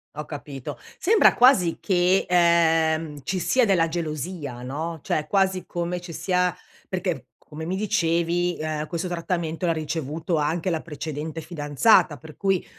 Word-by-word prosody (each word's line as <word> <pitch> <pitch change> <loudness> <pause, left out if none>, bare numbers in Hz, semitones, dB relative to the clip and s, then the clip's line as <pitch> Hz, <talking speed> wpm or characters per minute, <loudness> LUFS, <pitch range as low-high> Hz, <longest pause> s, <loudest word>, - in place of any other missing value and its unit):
Ho 150 +1 -5
capito, 145 -3 -7 0.2
sembra 420 +3 +5
quasi 220 -10 +5
che, 185 0 +2
ehm, 165 -3 +3
ci 185 +8 -2
sia 255 +8 +2
della 180 -5 +3
gelosia, 155 -5 -4
no, 160 +6 -4
cioè 150 0 -1
quasi 190 +1 +1
come 175 +1 -3
ci 175 -1 -9
sia 180 0 0 0.3
perché, 180 - -3
come 155 +1 -10
mi 180 +3 -2
dicevi, 175 -3 0
ehm, 155 -1 -3
questo 175 +2 -3
trattamento 170 -1 -2
l'ha - - +3
ricevuto 160 +1 -2
anche 160 +4 0
la 160 -2 -1
precedente 155 0 -5
fidanzata, 150 +2 +3
per 155 +3 -13
cui, 195 -2 +1
165 Hz, 145 wpm, -24 LUFS, 155-180 Hz, 0.3 s, sembra